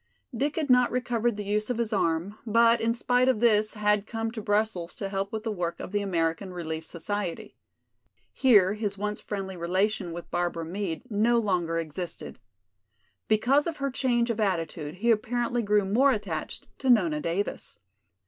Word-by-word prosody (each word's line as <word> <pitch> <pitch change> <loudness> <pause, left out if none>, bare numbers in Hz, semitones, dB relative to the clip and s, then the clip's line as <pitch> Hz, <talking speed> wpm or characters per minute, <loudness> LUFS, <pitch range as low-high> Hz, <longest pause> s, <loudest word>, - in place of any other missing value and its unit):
Dick 285 +5 -1
had 315 -3 -1
not 250 -1 +5
recovered 240 -2 0
the 210 - -3
use 210 +2 -1
of 245 - -1
his 230 -1 -1
arm, 175 +2 0
but 230 +1 +4
in 230 - +2
spite 245 +2 +2
of 250 -5 +2
this 215 -2 +3
had 210 0 +1
come 225 -1 -3
to 225 -1 -6
Brussels 205 -4 -1
to 195 - -4
help 195 0 -2
with 220 -1 -4
the 225 - -2
work 175 -4 -3
of - - -7
the 205 0 0
American 170 -1 -1
Relief 160 -3 -4
society. 190 +1 -4 0.8
Here 205 -7 +5
his 210 -2 -3
once 210 +1 -3
friendly 195 -2 -5
relation 180 +2 0
with 170 +1 -8
Barbara 175 -1 -1
Meade 170 -2 -4
no 225 +3 +3
longer 180 -7 0
existed. 165 +2 -5 0.9
Because 255 +8 +3
of 330 - -3
her 275 -1 -2
change 240 -2 +1
of 230 - -4
attitude 165 -6 -1
he 230 +5 +2
apparently 240 +2 0
grew 210 -2 +2
more 250 +8 +4
attached 205 -9 -4
to 265 - -1
Nona 175 -11 +4
Davis. 170 +6 -3
210 Hz, 175 wpm, -27 LUFS, 180-235 Hz, 0.9 s, not